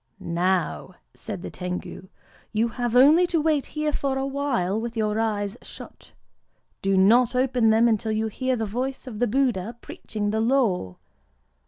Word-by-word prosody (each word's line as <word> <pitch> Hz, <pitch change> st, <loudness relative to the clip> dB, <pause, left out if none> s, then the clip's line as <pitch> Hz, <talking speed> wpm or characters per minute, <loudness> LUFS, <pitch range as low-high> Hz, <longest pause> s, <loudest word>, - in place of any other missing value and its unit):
"Now," 180 Hz, +1 st, -1 dB, 0.2 s
said 205 Hz, -6 st, -6 dB
the -, -, -6 dB
Tengu, 180 Hz, 0 st, -6 dB, 0.4 s
"you 220 Hz, +2 st, +1 dB
have 240 Hz, 0 st, -3 dB
only 305 Hz, +8 st, +6 dB
to 340 Hz, -2 st, 0 dB
wait 305 Hz, -2 st, +1 dB
here 305 Hz, -1 st, -2 dB
for 270 Hz, -2 st, -1 dB
awhile, 270 Hz, -7 st, -1 dB
with 235 Hz, 0 st, -5 dB
your 215 Hz, 0 st, 0 dB
eyes 210 Hz, -1 st, -1 dB
shut. -, -, -12 dB, 0.7 s
Do 195 Hz, 0 st, +1 dB
not 235 Hz, +6 st, +4 dB
open 250 Hz, -3 st, +2 dB
them 225 Hz, +2 st, +4 dB
until 220 Hz, -1 st, 0 dB
you 215 Hz, +1 st, 0 dB
hear 255 Hz, +4 st, -1 dB
the 225 Hz, -2 st, -2 dB
voice 255 Hz, +6 st, -4 dB
of 230 Hz, -5 st, -7 dB
the 245 Hz, -, +2 dB
Buddha 235 Hz, -3 st, 0 dB
preaching 205 Hz, -3 st, -5 dB
the 220 Hz, +1 st, 0 dB
Law. 225 Hz, -, +1 dB
225 Hz, 160 wpm, -24 LUFS, 205-260 Hz, 0.7 s, only